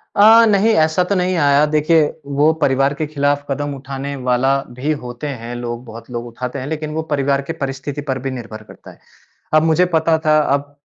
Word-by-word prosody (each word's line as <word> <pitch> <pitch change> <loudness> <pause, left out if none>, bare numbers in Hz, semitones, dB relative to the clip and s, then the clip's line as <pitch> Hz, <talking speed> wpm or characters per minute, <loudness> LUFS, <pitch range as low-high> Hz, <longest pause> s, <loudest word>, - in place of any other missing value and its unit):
अ, 225 +3 +7
नहीं 205 +2 +3
ऐसा 160 +3 +1
तो 200 - +1
नहीं 180 0 0
आया। 145 -1 +4
देखिए 155 +1 +4 0.3
वो 150 +2 +5
परिवार 135 0 +2
के 155 +2 -3
खिलाफ 145 -1 -1
कदम 145 +1 -2
उठाने 135 +1 -6
वाला 130 +2 +2 0.2
भी 145 +5 -1
होते 120 +4 -6
हैं 120 -3 -6
लोग, 120 0 -5
बहुत 115 +1 -11
लोग 120 0 -4
उठाते 125 +3 -6
हैं, 130 - -6
लेकिन 155 0 -4
वो 160 - -1
परिवार 140 -1 +1
की - - -1
परिस्थिति 135 +1 -4
पर 130 -1 -1
भी 135 +1 -4
निर्भर 115 -4 -8
करता - - -14
है। - - -20 0.6
अब 155 - +5
मुझे 160 +2 +3
पता 160 0 +3
था 155 0 +5 0.2
अब 145 0 -4
140 Hz, 205 wpm, -18 LUFS, 130-155 Hz, 0.6 s, अ